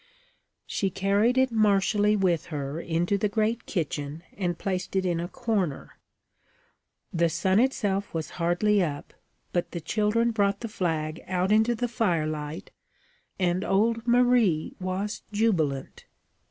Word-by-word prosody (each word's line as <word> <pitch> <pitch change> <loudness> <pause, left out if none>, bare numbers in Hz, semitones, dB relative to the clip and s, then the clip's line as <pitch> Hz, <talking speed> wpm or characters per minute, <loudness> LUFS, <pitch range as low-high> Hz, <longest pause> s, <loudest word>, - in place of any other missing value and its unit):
She 195 - -1
carried 200 +6 +2
it 260 -1 +3
martially 210 -1 +3
with 185 -5 +1
her 145 -1 -4
into 175 +4 0
the 210 - +1
great 220 +2 -1
kitchen, 155 -3 -3
and 175 -3 -2
placed 185 -1 -3
it 190 -1 +1
in 175 -2 0
a 170 - -3
corner. 195 -7 -2 1.1
The 170 -1 +2
sun 190 +5 +2
itself 205 -6 0
was 160 -3 -4
hardly 195 +5 +2
up, 145 -5 -3 0.4
but 175 - -1
the 170 - -3
children 215 +7 +1
brought 200 -2 +1
the 230 - -3
flag 165 -6 -2
out 185 +1 0
into 220 +3 +4
the 245 +2 -1
firelight 155 -9 -2 0.7
and 180 0 +1
old 230 +4 +1
Marie 240 -9 +3
was 185 +3 -3
jubilant. 170 -11 0
195 Hz, 135 wpm, -27 LUFS, 170-215 Hz, 1.1 s, into